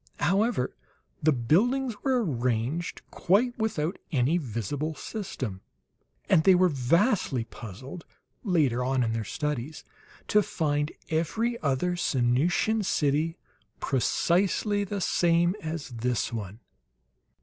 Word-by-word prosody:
However, 195 - +1 0.5
the 155 - +4
buildings 225 - +2
were 255 -4 +1
arranged 125 - -2
quite 230 +7 +2
without 195 -6 -1
any 145 +4 +2
visible 140 - -3
system. 130 - -5 0.7
And 160 - +4
they 190 +1 +6
were 180 0 +4
vastly 145 - +1
puzzled, 120 - -10 0.4
later 150 - +2
on 130 0 +1
in 115 -1 -1
their 115 -1 -2
studies, 150 +4 -4 0.5
to 210 - +5
find 150 -5 -1 0.2
every 220 +10 0
other 155 +5 0
Sanusian 160 - +1
city 155 -1 +1 0.4
precisely 195 - +1
the 200 0 -4
same 175 +1 +2
as 160 -2 -5
this 120 0 -2
one. 105 0 -6
155 Hz, 110 wpm, -27 LUFS, 125-185 Hz, 0.7 s, they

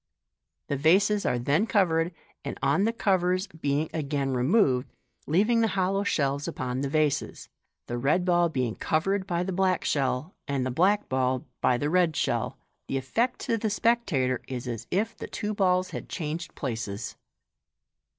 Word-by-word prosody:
The 140 - -2
vases 200 +8 +3
are 125 - +1
then 145 - +1
covered, 175 -6 +2 0.3
and - - -5
on 145 +9 +3
the 225 - +2
covers 185 -4 +1
being 150 -3 -1
again 140 -3 -1
removed, 130 - +2 0.4
leaving 215 +9 +3
the 225 - +3
hollow 195 +2 +1
shells 140 -6 0
upon 125 +1 -3
the 140 - -1
vases, 150 -1 0 0.4
the 120 0 -4
red 150 +8 +2
ball 175 -1 +3
being 125 -7 -1
covered 190 - 0
by 175 -1 0
the 190 +1 -3
black 185 0 +1
shell, 140 +4 0
and 135 -2 -1
the 130 - -1
black 195 +9 +2
ball 130 -1 0 0.2
by 125 - +3
the 145 +4 -1
red 175 -3 +3
shell, - - -1 0.3
the 135 - -1
effect 230 - 0
to 230 - 0
the 220 - 0
spectator 195 - +1
is 125 -1 -5
as 115 -1 -5
if 220 +5 0
the - - -7
two 210 0 -3
balls 185 -2 +2
had - - -6
changed 165 +1 -4
places. 115 -5 -4
160 Hz, 165 wpm, -27 LUFS, 135-190 Hz, 0.4 s, vases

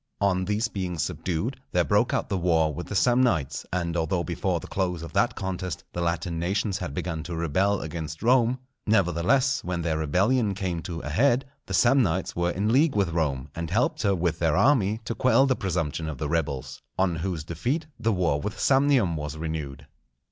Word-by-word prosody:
On 95 -2 +1
these 105 +4 0
being 90 -5 -4
subdued, 85 - -2
there 90 - +3
broke 105 +6 +2
out - - 0
the 100 - -1
war 80 -3 +2
with 85 +5 -6
the 105 - -5
Samnites; 120 - +2
and 85 -2 -1
although 85 +2 0
before 90 0 -1
the - - -10
close 90 -4 -2
of 85 - -8
that - - +2
contest 95 -2 -4
the 85 - -3
Latin 85 0 -1
nations 95 +3 -1
had 80 -6 -5
begun 80 -3 -3
to 85 +2 -5
rebel 95 +5 +1
against 80 +1 -6
Rome, 125 0 +4 0.3
nevertheless, 110 - +2
when 85 -1 -2
their 80 -2 0
rebellion 100 - +2
came 90 -4 -2
to 85 0 -5
a - - -5
head, 125 - +3 0.2
the 95 - -1
Samnites 120 -7 +2
were 85 0 +1
in 100 +5 0
league 145 +1 +4
with 100 -4 +2
Rome, 75 -5 -1
and 85 -1 -4
helped 115 +8 +1
her 100 -3 +2
with 85 -2 -1
their 85 -1 +2
army 110 -3 +3
to - - -2
quell 130 +2 +4
the 130 -1 +2
presumption 85 - -2
of 75 - -5
the 75 - -3
rebels; 70 -4 -2 0.2
on 90 -3 +1
whose 85 -2 -3
defeat 120 - -2
the 115 -1 +1
war 85 -7 +1
with 100 +5 -4
Samnium 135 - +3
was 75 0 -5
renewed. 75 -3 -5
90 Hz, 195 wpm, -26 LUFS, 80-105 Hz, 0.3 s, Rome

